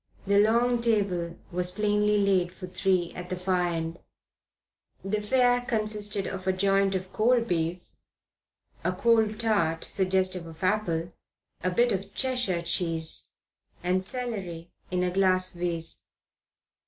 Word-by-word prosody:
The 200 0 +4
long 235 +3 +3
table 195 -7 0
was 180 0 -1
plainly 210 +1 +2
laid 190 -3 +2
for 185 - -8
three 185 -1 0
at 180 0 -8
the 185 - -2
far 180 0 0
end. 165 0 -3 1.1
The 210 +2 -1
fare 245 +2 +3
consisted 215 -4 -1
of 190 -1 -5
a 190 - +3
joint 195 +1 +2
of 185 0 -4
cold 235 +1 +2
beef, 170 -1 -2 0.9
a - - 0
cold 225 -2 +2
tart 185 -8 +1
suggestive 185 -2 0
of 165 +2 -11
apple, 180 -4 0 0.5
a 185 - +2
bit 235 +7 +2
of 195 0 -4
Cheshire 245 -10 0
cheese, 165 -2 0 0.5
and 185 +1 +1
celery 190 -8 -3 0.2
in 180 0 0
a 180 - 0
glass 185 -1 +3
vase. 170 -2 -1
190 Hz, 135 wpm, -27 LUFS, 180-215 Hz, 1.1 s, The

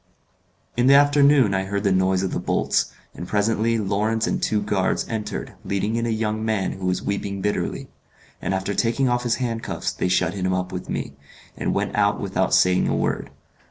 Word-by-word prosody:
In 120 +1 +2
the 140 - +7
afternoon 140 -5 +5
I 95 0 0
heard 100 +1 -2
the 100 - +2
noise 95 0 +2
of 95 - -1
the - - -1
bolts, - - 0 0.2
and 85 - -7
presently 110 +3 +1
Lawrence 110 +2 0
and - - -1
two 105 - +1
guards 100 -2 0
entered 105 -2 -4
leading 100 +3 -1
in 115 0 0
a - - -1
young 110 -1 -1
man 110 -4 0
who 95 -1 -4
was 90 - -1
weeping 100 -1 -3
bitterly; 105 +2 -2 0.5
and 95 - -1
after 95 +2 -2
taking 120 +6 +1
off 120 0 +1
his 120 -1 +1
handcuffs 115 -3 -3
they - - -2
shut 90 - +2
him 95 -2 -1
up 90 0 -2
with 90 -1 -6
me, 70 - -3 0.4
and - - -2
went - - -1
out - - +2
without - - -1
saying 90 0 +3
a - - +1
word. - - -1
105 Hz, 195 wpm, -23 LUFS, 95-115 Hz, 0.5 s, the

